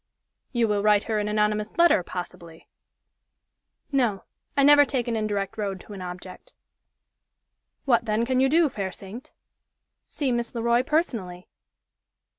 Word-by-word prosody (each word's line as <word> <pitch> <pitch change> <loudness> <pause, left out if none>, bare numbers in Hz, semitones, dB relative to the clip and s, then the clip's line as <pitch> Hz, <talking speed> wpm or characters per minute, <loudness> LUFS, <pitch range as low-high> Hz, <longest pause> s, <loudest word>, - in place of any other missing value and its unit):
"You 235 -3 +1
will 205 -1 0
write 210 0 +3
her 220 -2 -1
an 210 - -2
anonymous 210 0 -1
letter, 340 - +5
possibly?" 170 -2 -9 1.2
"No 240 -8 0 0.3
I 280 - +4
never 290 +1 +7
take 260 -4 -2
an 235 - -1
indirect 210 -1 -2
road 195 -2 -3
to 210 - -12
an 195 - -8
object." 180 - -9 1.3
"What, 235 -4 +2
then, 220 +1 0
can 255 +1 0
you 265 +1 +3
do, 325 +2 +4
fair 200 -8 -4
saint?" 205 +8 -11 0.8
"See 275 -4 -2
Miss 240 0 -3
Le 230 - -3
Roy, 235 +1 +3
personally." 230 - -2
220 Hz, 145 wpm, -25 LUFS, 200-255 Hz, 1.3 s, never